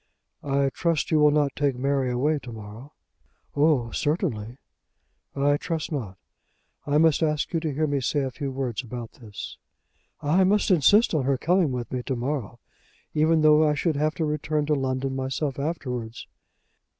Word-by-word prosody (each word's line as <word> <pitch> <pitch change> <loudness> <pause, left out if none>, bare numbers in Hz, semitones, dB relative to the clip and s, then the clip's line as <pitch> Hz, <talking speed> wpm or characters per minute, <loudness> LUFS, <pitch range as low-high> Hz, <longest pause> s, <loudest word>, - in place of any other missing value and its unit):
"I 140 -1 +1
trust 165 +1 -1
you 155 - +4
will 150 0 +6
not 145 -2 +1
take 145 -3 0
Mary 135 0 0
away 145 +5 +1
to 125 - -10
morrow." 110 +5 -10 0.6
"Oh; 145 -6 +2
certainly." 130 - -2 0.8
"I 145 +1 +2
trust 165 +1 -4
not. 110 -11 -4 0.7
I 145 +1 +2
must 160 0 +4
ask 150 -1 0
you 165 - +2
to 160 -2 -2
hear 155 +3 0
me 145 -2 -1
say 145 +3 0
a 135 -1 -2
few 140 +1 -4
words 130 -3 -3
about 120 -1 -7
this." 110 -4 -9 0.6
"I 165 +6 +3
must 200 +2 +2
insist 190 - +5
on 145 -5 +1
her 135 0 +2
coming 175 0 +2
with 125 -2 -4
me 125 - -2
to 130 +1 -3
morrow, 120 -2 -3 0.5
even 160 +1 +3
though 155 0 +6
I 150 -1 +2
should 160 +1 0
have 155 +2 0
to 160 - -1
return 150 0 -1
to 150 - +1
London 135 -1 -1
myself 135 +1 -2
afterwards." 125 -7 -4
145 Hz, 175 wpm, -25 LUFS, 130-155 Hz, 0.8 s, will